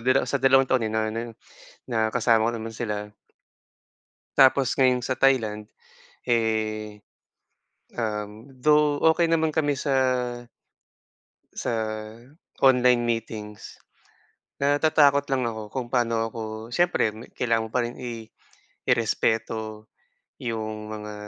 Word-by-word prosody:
dala 130 Hz, +3 st, +2 dB
sa 140 Hz, -, -2 dB
dalawang 135 Hz, 0 st, +5 dB
taon 125 Hz, -4 st, +1 dB
na 110 Hz, 0 st, -1 dB
ano, 115 Hz, -, -3 dB, 0.7 s
na 110 Hz, -2 st, 0 dB
kasama 115 Hz, -1 st, +3 dB
ko -, -, -2 dB
naman 115 Hz, 0 st, -5 dB
sila. 105 Hz, -2 st, -4 dB, 1.3 s
Tapos 135 Hz, -1 st, +4 dB
ngayon 125 Hz, -2 st, +3 dB
sa 130 Hz, +1 st, -2 dB
Thailand, 110 Hz, -6 st, +2 dB, 0.6 s
eh, 110 Hz, -2 st, -1 dB, 1.0 s
um, 105 Hz, +1 st, -4 dB
though 150 Hz, +1 st, +3 dB, 0.2 s
okey 170 Hz, -1 st, +1 dB
naman 160 Hz, -2 st, +1 dB
kami 145 Hz, -4 st, +1 dB
sa 140 Hz, -2 st, -1 dB, 1.6 s
sa -, -, -2 dB, 0.9 s
online 125 Hz, -2 st, +5 dB
meetings. 110 Hz, -2 st, -5 dB, 0.8 s
Natatakot 145 Hz, -1 st, +4 dB
lang 130 Hz, -2 st, 0 dB
ako 110 Hz, -2 st, -4 dB
kung 125 Hz, +3 st, -4 dB
paano 115 Hz, -2 st, +1 dB
ako 115 Hz, -, -7 dB, 0.3 s
siyempre 175 Hz, -6 st, +2 dB, 0.2 s
kailangan 115 Hz, -2 st, 0 dB
mo -, -, -22 dB
pa 125 Hz, -, +2 dB
rin 120 Hz, -, -6 dB
i 120 Hz, -3 st, -6 dB, 0.6 s
irespeto 110 Hz, -1 st, -1 dB, 0.5 s
'yong 110 Hz, -2 st, -4 dB
mga 105 Hz, 0 st, -7 dB
115 Hz, 115 wpm, -25 LUFS, 110-135 Hz, 1.6 s, dalawang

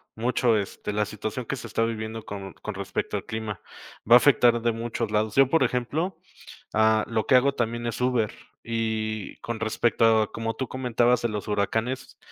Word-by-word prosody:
mucho, 120 Hz, 0 st, +2 dB
este, 100 Hz, 0 st, -4 dB
la 105 Hz, 0 st, +1 dB
situación 110 Hz, +4 st, -5 dB
que 135 Hz, -, -3 dB
se -, -, -8 dB
está 115 Hz, -, 0 dB
viviendo 110 Hz, -1 st, -4 dB
con 100 Hz, -1 st, -7 dB
con 105 Hz, -, -6 dB
respecto 100 Hz, 0 st, -3 dB
al -, -, -7 dB
clima, 110 Hz, -4 st, -5 dB, 0.5 s
va 120 Hz, -, +10 dB
a -, -, +12 dB
afectar 120 Hz, -3 st, +4 dB
de 120 Hz, -, +2 dB
muchos 115 Hz, -1 st, -3 dB
lados. 105 Hz, 0 st, 0 dB
Yo, 135 Hz, -1 st, +5 dB
por 165 Hz, -, +3 dB
ejemplo, 155 Hz, +9 st, -1 dB, 0.6 s
ah, 110 Hz, 0 st, +3 dB
lo 110 Hz, -1 st, -1 dB
que -, -, +3 dB
hago 140 Hz, +2 st, +4 dB
también 120 Hz, 0 st, -2 dB
es 120 Hz, -, -3 dB
Uber, 125 Hz, -4 st, +1 dB, 0.3 s
y 110 Hz, -2 st, -2 dB
con 120 Hz, -1 st, -4 dB
respecto 115 Hz, 0 st, +3 dB
a 110 Hz, -, -4 dB
como 115 Hz, 0 st, -3 dB
tú 130 Hz, -, -4 dB
comentabas 125 Hz, -1 st, +1 dB
de 120 Hz, -, +1 dB
los 105 Hz, -1 st, -5 dB
huracanes, 110 Hz, +5 st, -2 dB
115 Hz, 190 wpm, -26 LUFS, 110-120 Hz, 0.6 s, a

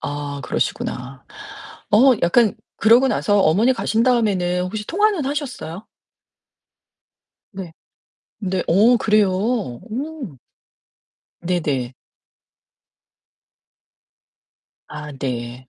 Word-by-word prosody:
아 145 Hz, -1 st, -5 dB
그러시구나. 125 Hz, +1 st, -3 dB, 0.7 s
어 255 Hz, +6 st, +6 dB
약간 210 Hz, +5 st, +3 dB, 0.2 s
그러고 235 Hz, +5 st, +5 dB
나서 205 Hz, -5 st, +1 dB
어머니 205 Hz, +10 st, +3 dB
가신 230 Hz, -1 st, 0 dB
다음에는 195 Hz, -8 st, +1 dB
혹시 210 Hz, +3 st, -5 dB
통화는 405 Hz, -4 st, +1 dB
하셨어요? 255 Hz, -, -5 dB, 1.7 s
네. 190 Hz, -4 st, -8 dB, 0.7 s
네 190 Hz, -3 st, -2 dB
어 215 Hz, +8 st, +5 dB
그래요? 210 Hz, -3 st, +3 dB
오. 225 Hz, -, -4 dB, 1.1 s
네네. 150 Hz, -8 st, -2 dB, 3.0 s
아 150 Hz, 0 st, -7 dB
네. 125 Hz, -2 st, -5 dB
195 Hz, 165 characters per minute, -20 LUFS, 155-240 Hz, 3.0 s, 어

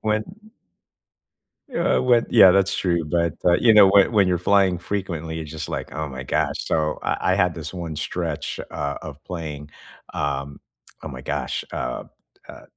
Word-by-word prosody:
when 110 Hz, 0 st, 0 dB, 1.5 s
uh, 170 Hz, -, +2 dB
when 120 Hz, -2 st, +3 dB
yeah, 95 Hz, -, +8 dB
that's 95 Hz, +1 st, +2 dB
true, 85 Hz, -3 st, 0 dB
but, 85 Hz, +1 st, 0 dB
uh, 90 Hz, -, +5 dB
you 115 Hz, -, +6 dB
know, 105 Hz, -2 st, +8 dB
when 100 Hz, 0 st, +5 dB
when 100 Hz, -3 st, +4 dB
you're 90 Hz, -1 st, +1 dB
flying 95 Hz, 0 st, +3 dB
frequently, 85 Hz, -5 st, -4 dB
it's 80 Hz, -2 st, -7 dB
just 80 Hz, -1 st, -6 dB
like, -, -, -5 dB
"Oh 80 Hz, -1 st, -3 dB
my 65 Hz, -1 st, -7 dB
gosh," -, -, 0 dB
so 75 Hz, -1 st, -1 dB
I -, -, 0 dB, 0.2 s
I -, -, +3 dB
had 90 Hz, -3 st, +2 dB
this 80 Hz, -2 st, -7 dB
one 85 Hz, -3 st, -5 dB
stretch, 80 Hz, 0 st, -3 dB
uh, 70 Hz, 0 st, -3 dB
of 75 Hz, -3 st, -9 dB
playing, 75 Hz, -4 st, -7 dB, 0.4 s
um, 70 Hz, 0 st, -3 dB, 0.5 s
oh -, -, -5 dB
my -, -, -8 dB
gosh, -, -, -3 dB
uh, 60 Hz, 0 st, -4 dB, 0.4 s
uh, -, -, -11 dB
85 Hz, 175 wpm, -23 LUFS, 75-95 Hz, 1.5 s, yeah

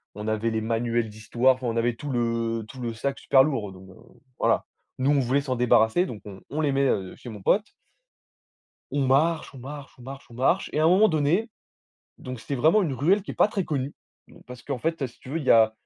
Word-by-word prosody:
on 105 Hz, +1 st, -6 dB
avait 110 Hz, +1 st, 0 dB
les 110 Hz, 0 st, -1 dB
manuels 115 Hz, 0 st, -1 dB
d'histoire. 120 Hz, +5 st, +1 dB
Enfin, 130 Hz, -1 st, -5 dB
on 115 Hz, 0 st, -1 dB
avait 120 Hz, +1 st, +1 dB
tout 145 Hz, +5 st, -7 dB
le 115 Hz, -2 st, -1 dB
tout 130 Hz, +2 st, -10 dB
le 120 Hz, -1 st, -3 dB
sac 135 Hz, +5 st, -3 dB
super 135 Hz, -1 st, +5 dB
lourd 120 Hz, -10 st, -2 dB
donc 95 Hz, 0 st, -14 dB
heu. 95 Hz, -, -14 dB, 0.4 s
Voilà. -, -, +2 dB, 0.3 s
Nous, 130 Hz, +2 st, +2 dB
on 145 Hz, -, +3 dB
voulait 135 Hz, +2 st, +1 dB
s'en 130 Hz, -2 st, -2 dB
débarrasser 120 Hz, +6 st, +3 dB
donc 110 Hz, -, -8 dB
on 95 Hz, -2 st, -10 dB
on 155 Hz, +3 st, -2 dB
les 145 Hz, -2 st, +1 dB
met, 135 Hz, 0 st, +2 dB
heu, 95 Hz, -6 st, -1 dB
chez 125 Hz, -, -10 dB
mon 105 Hz, -3 st, -9 dB
pote 205 Hz, -, +2 dB, 1.3 s
on 140 Hz, -1 st, 0 dB
marche, 150 Hz, +4 st, +2 dB
on 135 Hz, -, -11 dB
marche, 140 Hz, +2 st, -9 dB
on -, -, -13 dB
marche, 135 Hz, +2 st, -9 dB
on -, -, -12 dB
marche 135 Hz, +10 st, +1 dB
et -, -, 0 dB
à -, -, +3 dB
un -, -, +6 dB
moment 205 Hz, +5 st, +5 dB
donné 160 Hz, +9 st, +1 dB, 0.7 s
donc 130 Hz, -1 st, -7 dB
c'était 140 Hz, -, -4 dB
vraiment 160 Hz, -, +4 dB
une 160 Hz, -7 st, -1 dB
ruelle 180 Hz, +10 st, +2 dB
qui -, -, -8 dB
est -, -, -6 dB
pas -, -, +4 dB
très 195 Hz, -3 st, -2 dB
connue, 140 Hz, -2 st, -3 dB, 0.3 s
mmh, -, -, -18 dB
parce 125 Hz, -1 st, -9 dB
qu'en 140 Hz, -3 st, -3 dB
fait, 165 Hz, 0 st, -1 dB
heu, -, -, +1 dB
si 120 Hz, -, -17 dB
tu -, -, -13 dB
veux, 160 Hz, -, -1 dB
il 155 Hz, -, -6 dB
y -, -, +5 dB
a 110 Hz, -1 st, +5 dB
130 Hz, 250 wpm, -25 LUFS, 115-145 Hz, 1.3 s, un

